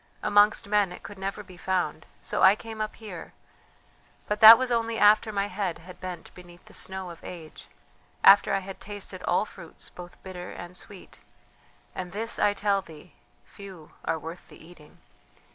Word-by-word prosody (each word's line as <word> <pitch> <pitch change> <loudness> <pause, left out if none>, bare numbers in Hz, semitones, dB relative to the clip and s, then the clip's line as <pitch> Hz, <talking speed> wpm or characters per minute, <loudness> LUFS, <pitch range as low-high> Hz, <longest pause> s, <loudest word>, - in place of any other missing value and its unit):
Amongst 205 0 +4
men 205 -2 +2
it - - -10
could 200 -1 -10
never 195 +2 -4
be 185 -2 -14
found, 175 -4 -2 0.2
so - - -1
I 190 +2 +7
came 220 0 -8
up 215 - -3
here; 205 -7 -9 0.9
but 210 0 -1
that 220 +1 +12
was 260 0 -2
only 230 -1 0
after 215 +1 +5
my 200 -1 0
head 190 -3 -3
had 180 +2 -13
bent 180 -3 -7
beneath 175 -1 -15
the - - -17
snow 190 -1 -5
of 170 - -14
age, 160 - -10 0.6
after 200 +1 +7
I 195 0 +1
had 195 0 -8
tasted 200 -2 -7
all 180 - +1
fruits 170 -6 -11
both 175 -1 -12
bitter 180 -2 -8
and 175 +1 -9
sweet; 190 +1 -11 0.7
and 180 -1 -6
this 225 +3 -3
I 205 -1 +3
tell 200 -1 +1
thee: 160 -1 -15 0.3
few 190 -6 -12
are - - -1
worth 165 +3 -9
the - - -15
eating. 160 -3 -17
190 Hz, 180 wpm, -27 LUFS, 175-205 Hz, 0.9 s, that